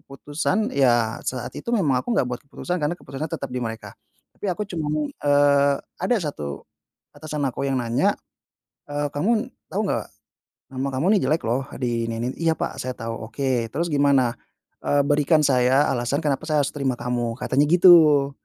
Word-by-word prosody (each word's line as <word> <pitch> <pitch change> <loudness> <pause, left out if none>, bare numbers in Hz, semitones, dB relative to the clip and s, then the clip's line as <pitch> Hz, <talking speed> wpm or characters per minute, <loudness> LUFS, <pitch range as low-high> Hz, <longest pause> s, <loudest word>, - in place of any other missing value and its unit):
keputusan, 150 +9 -2
ya 120 -5 +2
saat 125 -2 -4
itu - - -13
memang 140 -10 +2
aku 240 - -3
enggak - - +3
buat 125 - -4
keputusan, 180 +5 -4
karena 150 +4 -1
keputusannya 140 +2 -6
tetap - - -4
di 125 - -2
mereka. 115 -1 -5 0.4
Tapi 205 - -5
aku 195 +4 -1
cuman, 155 -4 -2
eee, 145 -1 +3 0.3
ada 190 +7 +2
1 75 - -5 0.5
atasan 150 -1 -4
aku 130 - -4
yang 130 -2 0
nanya, 120 0 +1 0.8
eee, 145 0 -1
"Kamu 220 - 0 0.2
tahu - - -1
nggak, - - -1 0.7
nama 135 +1 -2
kamu 140 +7 0
ini - - +4
jelek 155 +4 +1
loh, 130 +4 -1
di 120 -2 -1
ini 115 0 -3
ini." 120 - -1
"Iya 165 -1 +2
pak, - - -4
saya 130 0 -4
tahu." 115 0 -5 0.2
"Oke, 130 -2 -1
terus 170 +4 -1
gimana? 140 -4 +3 0.5
Eee, 145 0 +2
berikan 150 +1 +3
saya 130 +1 +3
alasan 130 +4 -1
kenapa 145 -4 -1
saya 150 -2 +2
harus - - -2
terima 135 -3 -1
kamu?" 120 -2 -2
Katanya 145 +3 +1
gitu. 160 -5 +6
140 Hz, 175 wpm, -23 LUFS, 125-155 Hz, 0.8 s, gitu